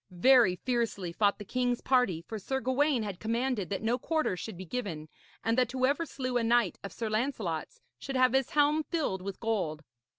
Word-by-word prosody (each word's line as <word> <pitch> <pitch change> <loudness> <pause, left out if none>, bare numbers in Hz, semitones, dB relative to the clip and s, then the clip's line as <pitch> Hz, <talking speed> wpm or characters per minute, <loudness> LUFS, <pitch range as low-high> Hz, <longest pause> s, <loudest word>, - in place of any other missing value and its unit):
Very 200 +1 +5
fiercely 225 -6 -2
fought 200 +2 +2
the 205 - -8
king's 245 +2 0
party, 250 -11 +2
for 220 +4 -6
Sir 265 +7 -2
Gawaine 260 0 +1
had 200 -3 -5
commanded 230 -2 -1
that 200 +1 -3
no 235 +3 +1
quarter 315 - 0
should 190 +1 -7
be 185 - -7
given, 170 -8 -4 0.3
and 225 +1 +1
that 250 -1 +1
whoever 275 +6 +1
slew 255 -2 -2
a 240 - +1
knight 230 -4 +2
of 200 - -6
Sir 230 - -4
Lancelot's 220 - -2 0.2
should 270 - -5
have 255 -1 +4
his 265 -1 +2
helm 295 +1 +3
filled 295 - -2
with 195 +1 -6
gold. 180 -9 -2
235 Hz, 195 wpm, -30 LUFS, 195-260 Hz, 0.3 s, Very